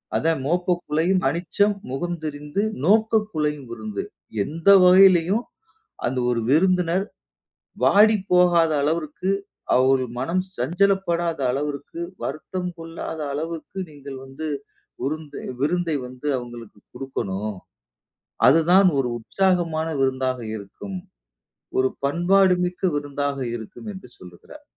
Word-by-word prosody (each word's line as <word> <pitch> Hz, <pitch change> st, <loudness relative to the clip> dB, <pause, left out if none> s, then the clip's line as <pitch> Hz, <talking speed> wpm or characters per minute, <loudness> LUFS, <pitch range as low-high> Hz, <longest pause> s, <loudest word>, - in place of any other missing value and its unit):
அதான், 165 Hz, -3 st, +1 dB
"மோப்ப 180 Hz, +3 st, +1 dB
குழையும் 170 Hz, +5 st, +1 dB
அனிச்சம், 185 Hz, +6 st, +1 dB, 0.2 s
முகம் 175 Hz, +6 st, -3 dB
தெரிந்து 150 Hz, +4 st, -3 dB, 0.2 s
நோக்க 220 Hz, +3 st, +4 dB
குழையும் 150 Hz, -4 st, -2 dB
விருந்து" 110 Hz, -3 st, -5 dB, 0.4 s
எந்த 165 Hz, -, -7 dB, 0.2 s
வகைளையும், 185 Hz, +3 st, +6 dB, 0.6 s
அந்த 125 Hz, +2 st, -1 dB
ஒரு 120 Hz, -1 st, +1 dB
விருந்தினர் 180 Hz, +4 st, +3 dB, 0.8 s
வாடி 215 Hz, +1 st, +6 dB
போகாத 175 Hz, -2 st, +5 dB
அளவிற்கு, 160 Hz, +4 st, -1 dB, 0.5 s
அவர்கள் 130 Hz, -1 st, +3 dB
மனம் 170 Hz, +8 st, 0 dB
சஞ்சலப்படாத 175 Hz, +3 st, +1 dB
அளவிற்கு, 145 Hz, +3 st, -4 dB, 0.2 s
வருத்தம் 180 Hz, +5 st, -4 dB
கொள்ளாத 165 Hz, 0 st, -6 dB
அளவுக்கு 165 Hz, +5 st, -5 dB
நீங்கள் 140 Hz, -2 st, -9 dB
வந்து 135 Hz, +4 st, -6 dB, 0.5 s
விருந்து 150 Hz, +1 st, -4 dB, 0.2 s
விருந்தை 165 Hz, +1 st, +1 dB
வந்து 125 Hz, +3 st, -8 dB
அவங்களுக்கு 120 Hz, -4 st, -9 dB
கொடுக்கணும். 105 Hz, -6 st, -4 dB, 0.9 s
அதுதான் 175 Hz, +7 st, +6 dB
ஒரு 130 Hz, -, +1 dB
உற்சாகமான 170 Hz, +2 st, 0 dB
விருந்தாக 130 Hz, -1 st, 0 dB, 0.2 s
இருக்கும். 110 Hz, -, -8 dB, 0.8 s
ஒரு 130 Hz, 0 st, +3 dB, 0.2 s
பண்பாடு 180 Hz, +6 st, +4 dB
மிக்க 180 Hz, +2 st, -6 dB
விருந்தாக 145 Hz, -1 st, -3 dB, 0.2 s
இருக்கும் 120 Hz, -, -8 dB
என்று 190 Hz, -10 st, -11 dB
சொல்லுகிறார். 90 Hz, -1 st, -14 dB
160 Hz, 105 wpm, -23 LUFS, 135-180 Hz, 0.9 s, வகைளையும்